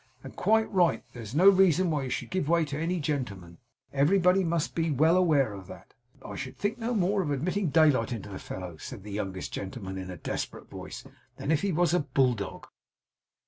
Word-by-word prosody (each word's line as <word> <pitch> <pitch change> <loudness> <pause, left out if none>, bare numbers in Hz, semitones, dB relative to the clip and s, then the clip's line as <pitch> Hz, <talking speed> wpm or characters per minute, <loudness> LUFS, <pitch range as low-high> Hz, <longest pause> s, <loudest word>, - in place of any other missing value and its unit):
And - - -10
quite 220 0 +3
right. 175 -7 +3
There 120 - -8
is 110 +3 -8
no 180 +5 +6
reason 185 -3 +5
why 145 -3 -1
you - - -4
should - - -4
give 185 -5 -1
way 170 -1 +3
to 145 0 -4
any 170 +3 -1
gentleman. 105 - -4 0.3
Everybody 180 +6 +4
must 165 -2 -1
be 165 -1 0
well 155 +4 +4
aware 150 - +3
of 95 -2 -9
that.' - - -12 0.3
'I - - -6
should - - -6
think 215 +4 -2
no 235 +1 -1
more 195 0 +2
of 165 - -2
admitting 170 +6 0
daylight 145 -7 +4
into 110 -4 -5
the 95 - -7
fellow,' 90 -3 -7
said 110 +3 -8
the 105 - -8
youngest 95 -2 -4
gentleman, 95 -1 -5
in 95 0 -6
a 90 - -7
desperate - - -5
voice, - - -8 0.3
'than 150 - -2
if 155 - +2
he 200 - 0
was 170 0 +2
a 180 - +4
bulldog. 125 -8 0
150 Hz, 210 wpm, -28 LUFS, 110-180 Hz, 0.3 s, no